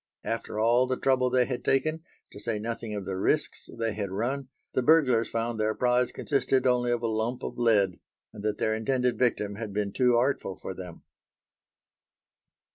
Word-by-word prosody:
After 115 Hz, -1 st, -3 dB
all 120 Hz, +3 st, +4 dB
the 130 Hz, 0 st, -1 dB
trouble 130 Hz, -1 st, +2 dB
they 125 Hz, 0 st, +3 dB
had 125 Hz, -1 st, -4 dB
taken, 155 Hz, +4 st, +1 dB, 0.3 s
to -, -, -10 dB
say 110 Hz, 0 st, -2 dB
nothing 115 Hz, 0 st, -4 dB
of 100 Hz, -2 st, -4 dB
the 95 Hz, -, -3 dB
risks -, -, 0 dB
they 115 Hz, -2 st, -1 dB
had 100 Hz, -2 st, -3 dB
run, 125 Hz, +8 st, -2 dB, 0.3 s
the -, -, +2 dB
burglars 130 Hz, -5 st, +4 dB
found 115 Hz, 0 st, -2 dB
their 110 Hz, 0 st, +1 dB
prize 125 Hz, 0 st, +2 dB
consisted 135 Hz, -2 st, 0 dB
only 125 Hz, -1 st, +2 dB
of 120 Hz, -1 st, -1 dB
a -, -, +1 dB
lump 115 Hz, +3 st, -2 dB
of -, -, -5 dB
lead, 105 Hz, -6 st, +3 dB, 0.3 s
and 105 Hz, -, -9 dB
that 105 Hz, 0 st, -1 dB
their 110 Hz, -, +1 dB
intended 125 Hz, +2 st, 0 dB
victim 105 Hz, -5 st, 0 dB
had 110 Hz, -2 st, -5 dB
been 100 Hz, -1 st, -1 dB
too 125 Hz, -2 st, +3 dB
artful 120 Hz, -6 st, 0 dB
for 95 Hz, -, -7 dB
them. 90 Hz, -2 st, -9 dB
115 Hz, 185 wpm, -28 LUFS, 105-125 Hz, 0.3 s, all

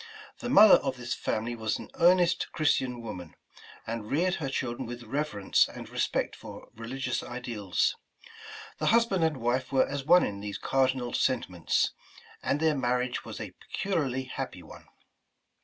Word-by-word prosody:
The 245 Hz, -, -4 dB
mother 215 Hz, -3 st, +9 dB
of 135 Hz, -2 st, -3 dB
this 120 Hz, -1 st, -3 dB
family 115 Hz, +2 st, -2 dB
was 110 Hz, -1 st, -1 dB
an -, -, -10 dB
earnest 175 Hz, 0 st, +4 dB
Chris 155 Hz, -2 st, +3 dB
tian 125 Hz, -2 st, -4 dB
woman, 90 Hz, -8 st, -8 dB, 0.5 s
and 110 Hz, -1 st, -5 dB
reared 175 Hz, +5 st, +1 dB
her 135 Hz, -, -2 dB
children 130 Hz, -2 st, -3 dB
with 120 Hz, 0 st, -7 dB
reverence 115 Hz, -5 st, +1 dB
and -, -, -9 dB
respect -, -, -1 dB
for -, -, -11 dB
religious 125 Hz, +3 st, -3 dB
ideals. 120 Hz, -6 st, -1 dB, 0.8 s
The -, -, 0 dB
husband 225 Hz, -6 st, +3 dB
and 160 Hz, -3 st, +1 dB
wife 125 Hz, +2 st, -1 dB
were 135 Hz, -1 st, +3 dB
as 140 Hz, 0 st, -4 dB
one 175 Hz, +5 st, +6 dB
in 100 Hz, -1 st, -4 dB
these 100 Hz, 0 st, -5 dB
cardinal 130 Hz, -2 st, 0 dB
sentiments, 95 Hz, -9 st, +1 dB, 0.5 s
and 145 Hz, -, 0 dB
their 160 Hz, -1 st, +2 dB
marriage 125 Hz, -1 st, -1 dB
was -, -, -8 dB
a -, -, -6 dB
peculiarly 145 Hz, -10 st, -2 dB
happy 130 Hz, -, -6 dB
one. -, -, -13 dB
130 Hz, 155 wpm, -29 LUFS, 115-150 Hz, 0.8 s, mother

